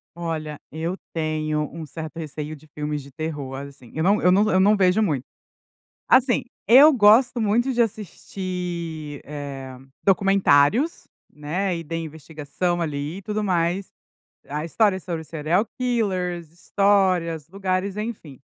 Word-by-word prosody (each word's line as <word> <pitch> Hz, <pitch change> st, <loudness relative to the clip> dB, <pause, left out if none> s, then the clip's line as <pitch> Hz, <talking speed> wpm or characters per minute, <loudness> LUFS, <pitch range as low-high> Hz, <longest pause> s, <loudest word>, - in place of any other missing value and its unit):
Olha, 160 Hz, -3 st, -4 dB
eu 165 Hz, +4 st, -3 dB, 0.2 s
tenho 155 Hz, -1 st, -1 dB
um 165 Hz, -1 st, -6 dB
certo 155 Hz, +3 st, -8 dB
receio 155 Hz, -1 st, -5 dB
de 155 Hz, +1 st, -18 dB
filmes 150 Hz, 0 st, -4 dB
de 140 Hz, +1 st, -14 dB
terror, 145 Hz, -4 st, -5 dB
assim, 135 Hz, -3 st, -10 dB
eu 160 Hz, -, 0 dB
não 200 Hz, +4 st, +3 dB
eu 180 Hz, -, +4 dB
não 205 Hz, +4 st, +4 dB
eu 185 Hz, -, +4 dB
não 205 Hz, +3 st, +5 dB
vejo 190 Hz, +1 st, +3 dB
muito. 150 Hz, -, 0 dB, 0.9 s
Assim, 255 Hz, -1 st, +4 dB, 0.2 s
eu 270 Hz, +8 st, +8 dB
gosto 235 Hz, +1 st, +5 dB
muito 230 Hz, +5 st, +2 dB
de 240 Hz, -, 0 dB
assistir, 180 Hz, -7 st, -4 dB
eh, 140 Hz, -3 st, -7 dB, 0.3 s
documentários, 195 Hz, -, +3 dB, 0.3 s
né, 175 Hz, +6 st, -2 dB
e 165 Hz, -, -6 dB
de 165 Hz, +2 st, -4 dB
investigação, 160 Hz, +2 st, -3 dB
ali, 150 Hz, +1 st, -3 dB
e -, -, -10 dB
tudo 210 Hz, +2 st, -2 dB
mais. 180 Hz, 0 st, 0 dB, 0.6 s
A 150 Hz, +2 st, -3 dB
história 195 Hz, +2 st, +2 dB
sobre 170 Hz, -3 st, -5 dB
serial 160 Hz, +6 st, 0 dB
killers, 185 Hz, -9 st, -1 dB
histórias, 180 Hz, -4 st, +1 dB
lugares, 190 Hz, +1 st, -2 dB
enfim. 210 Hz, -, -6 dB
170 Hz, 140 wpm, -23 LUFS, 150-200 Hz, 0.9 s, eu